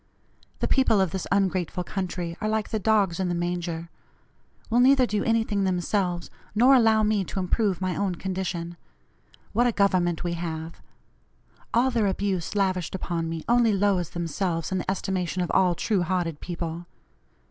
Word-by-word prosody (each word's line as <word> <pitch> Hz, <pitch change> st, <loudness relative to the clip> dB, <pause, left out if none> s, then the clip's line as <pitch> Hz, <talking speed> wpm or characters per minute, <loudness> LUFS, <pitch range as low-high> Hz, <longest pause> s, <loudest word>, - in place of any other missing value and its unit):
The -, -, +1 dB
people 245 Hz, -6 st, +3 dB
of 190 Hz, -4 st, +1 dB
this 190 Hz, 0 st, -4 dB
ungrateful 185 Hz, -3 st, 0 dB
country 175 Hz, -2 st, -4 dB
are 215 Hz, -, 0 dB
like 215 Hz, -1 st, -1 dB
the 220 Hz, -, -1 dB
'dogs 200 Hz, -4 st, +2 dB
in 185 Hz, -2 st, 0 dB
the 175 Hz, -, -1 dB
manger;' 170 Hz, -1 st, -3 dB, 0.8 s
will 235 Hz, +1 st, +2 dB
neither 260 Hz, +1 st, +6 dB
do 210 Hz, -3 st, -1 dB
anything 225 Hz, -3 st, +1 dB
themselves, 180 Hz, -1 st, -1 dB, 0.2 s
nor 250 Hz, +5 st, +6 dB
allow 225 Hz, -4 st, +5 dB
me 210 Hz, -2 st, +2 dB
to -, -, -7 dB
improve 190 Hz, 0 st, 0 dB
my 185 Hz, -2 st, -1 dB
own 195 Hz, -3 st, -1 dB
condition. 175 Hz, -2 st, -4 dB, 0.8 s
What 240 Hz, +3 st, +3 dB
a -, -, +2 dB
Government 185 Hz, -5 st, +1 dB
we 175 Hz, -1 st, -1 dB
have! 165 Hz, -1 st, -5 dB, 0.9 s
All 250 Hz, +3 st, +3 dB
their 225 Hz, -4 st, +1 dB
abuse 195 Hz, -1 st, -2 dB
lavished 185 Hz, -3 st, 0 dB
upon 170 Hz, -3 st, -3 dB
me 165 Hz, -1 st, -5 dB
only 235 Hz, -2 st, +4 dB
lowers 195 Hz, -4 st, +1 dB
themselves 170 Hz, -1 st, -2 dB
in 190 Hz, -, 0 dB
the -, -, -4 dB
estimation 185 Hz, -1 st, -1 dB
of 175 Hz, -, -3 dB
all 180 Hz, -2 st, +3 dB
true 200 Hz, +2 st, 0 dB
hearted 175 Hz, -3 st, -1 dB
people. 170 Hz, -1 st, -5 dB
185 Hz, 165 wpm, -26 LUFS, 175-210 Hz, 0.9 s, neither